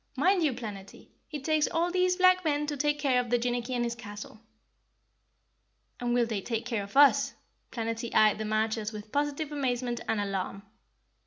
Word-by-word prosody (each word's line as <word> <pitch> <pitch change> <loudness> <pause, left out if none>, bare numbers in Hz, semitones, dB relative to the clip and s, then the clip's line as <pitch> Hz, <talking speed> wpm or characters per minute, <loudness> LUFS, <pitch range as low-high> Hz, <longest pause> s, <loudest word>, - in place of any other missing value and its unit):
Mind 370 +6 +3
you, 300 -5 +2
Planetty, 205 -5 -9 0.2
it 295 -3 -6
takes 310 0 +2
all 340 +1 0
these 365 0 +2
black 370 0 +4
men 295 -2 0
to 295 0 -3
take 295 +1 +1
care 275 -4 +2
of 245 - -2
Jinnicky 245 +1 -1
and 240 - 0
his 235 0 -1
castle." 215 -2 -10 1.6
"And 240 0 0
will 245 -1 +3
they 220 -4 -3
take 230 +2 -3
care 230 -4 -1
of 200 +6 -7
us?" 285 0 +5 0.4
Planetty 230 0 -3
eyed 215 -1 +5
the 215 - -2
marchers 215 0 -1
with 210 0 -9
positive 290 +1 -1
amazement 250 -4 -2
and 225 - 0
alarm. 195 0 -3
245 Hz, 175 wpm, -29 LUFS, 220-295 Hz, 1.6 s, us